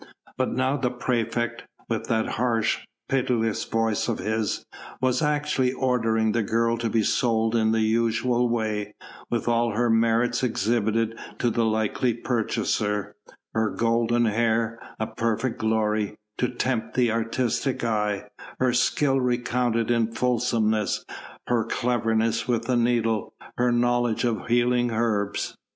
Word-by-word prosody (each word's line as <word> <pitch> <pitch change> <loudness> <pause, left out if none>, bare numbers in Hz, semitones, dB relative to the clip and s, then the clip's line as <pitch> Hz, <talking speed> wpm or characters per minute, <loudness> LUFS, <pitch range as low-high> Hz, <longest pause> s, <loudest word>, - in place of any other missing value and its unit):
But 130 - 0
now 130 +2 +1
the 130 -3 0
praefect, 120 -1 -2 0.2
with - - -2
that 110 -1 +1
harsh, 115 -2 +1 0.3
pitiless 125 -4 0
voice 115 -2 0
of 115 - -1
his, 110 -1 -2 0.3
was 130 -1 +1
actually 150 -4 +1
ordering 115 -4 +1
the 115 - +1
girl 115 +2 +1
to 115 -1 -1
be 110 0 +2
sold 115 0 +1
in 110 -1 +3
the 110 0 +2
usual 115 +2 +1
way, 105 -3 -2 0.3
with 120 -1 -2
all 120 -1 +2
her 120 +1 +2
merits 115 +1 +2
exhibited 115 -1 0 0.2
to 120 - +1
the 115 0 +1
likely 110 +2 0
purchaser: 105 -3 -1 0.4
her 110 -1 +1
golden 115 +1 +1
hair 115 +1 +1 0.2
a 110 - 0
perfect 115 +2 -2
glory 110 -1 0 0.2
to 125 - +1
tempt 125 -2 -2
the 125 -2 +3
artistic 115 +3 -1
eye, 105 -3 -1 0.3
her 130 -1 +2
skill 135 +2 +2
recounted 120 -2 0
in 115 -1 +1
fulsomeness, 115 -3 0 0.4
her 120 -2 +1
cleverness 115 -2 0
with 120 -2 +1
the 125 +1 +1
needle, 115 -3 +1 0.2
her 125 0 +3
knowledge 120 -1 +1
of 115 -5 -1
healing 120 +1 +2
herbs. 110 -3 -1
115 Hz, 135 wpm, -25 LUFS, 110-120 Hz, 0.4 s, in